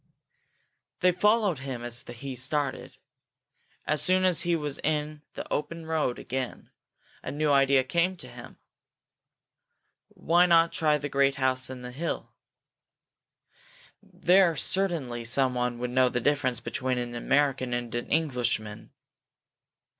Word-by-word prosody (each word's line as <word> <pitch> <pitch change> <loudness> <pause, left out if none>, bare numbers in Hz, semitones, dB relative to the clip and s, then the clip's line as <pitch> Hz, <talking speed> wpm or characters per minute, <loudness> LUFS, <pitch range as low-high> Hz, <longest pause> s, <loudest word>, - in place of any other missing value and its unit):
They 180 0 +5
followed 205 -2 +2
him 130 -3 -6
as 120 +1 -4
he 130 +3 -7
started. 135 +2 -3 0.9
As 150 -1 +1
soon 185 0 +3
as 180 -2 +3
he 175 -1 +1
was 150 -3 -2
in 150 0 -2
the - - -5
open 165 +2 -3
road 155 -6 -1
again, 130 0 -5 0.5
a - - -6
new 145 +2 0
idea 135 -1 +4
came 170 +7 0
to - - -9
him. - - -12 1.5
Why 175 +2 +2
not 165 -1 +5
try 150 -2 +2
the 145 0 -4
great 140 0 +2
house 130 -1 0
on 130 -1 -8
the 125 - -7
hill? 160 +7 -4 1.7
There 185 -2 +3
certainly 155 -9 -1
someone 125 0 +1
would 125 0 -4
know 130 0 +3
the 125 - -1
difference 130 -2 +1
between 125 +2 -2
an 120 -1 -4
American 135 +1 +1
and 120 -1 -3
an 120 0 -3
Englishman. 125 -9 -1
140 Hz, 130 wpm, -27 LUFS, 125-165 Hz, 1.7 s, They